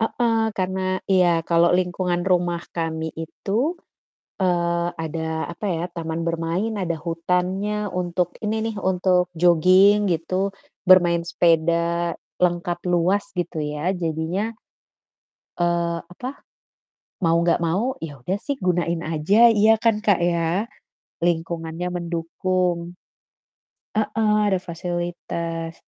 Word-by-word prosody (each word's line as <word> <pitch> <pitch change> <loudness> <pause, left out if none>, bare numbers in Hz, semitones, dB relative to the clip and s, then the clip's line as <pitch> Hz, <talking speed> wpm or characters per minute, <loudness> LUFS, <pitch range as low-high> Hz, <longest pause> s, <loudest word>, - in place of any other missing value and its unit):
Heeh, 225 0 +1
karena 185 0 -1
iya, 185 -2 +4 0.2
kalau 170 0 +4
lingkungan 180 -1 -1
rumah 175 -2 +2 0.2
kami 160 -1 -3
itu, 220 - -2 0.6
eee, 170 -1 +1
ada 160 0 -3
apa 190 +5 -6
ya, 165 -2 -1
taman 165 -1 -3
bermain, 170 +6 -1
ada 175 -5 -2
hutannya 180 +5 -1
untuk 180 -1 -1
ini 215 0 -1
nih, 225 -1 -4
untuk 180 -1 +2
jogging 185 +4 +5
gitu, 185 +4 0 0.3
bermain 175 -2 +5
sepeda, 170 0 +1 0.2
lengkap, 175 0 +1
luas 180 +4 +1
gitu 170 -3 -2
ya, 150 +5 -2
jadinya, 170 +5 -2 1.1
eee, 170 -1 +1
apa, 250 +11 -8 0.9
mau 165 0 +4
gak 170 0 +3
mau 210 +11 0
ya 145 -4 -7
udah 185 +9 -1
sih 285 - -1
gunain 175 -2 0
aja, 170 +9 +4
iya 215 +2 +6
kan 230 -2 +3
Kak 205 -4 +4
ya? 170 +5 0 0.6
Lingkungannya 165 0 -2
mendukung. 175 +1 -1 1.0
Heeh, 215 0 +1 0.2
ada 190 - +2
fasilitas. 170 -1 -4
175 Hz, 110 wpm, -23 LUFS, 165-190 Hz, 1.1 s, iya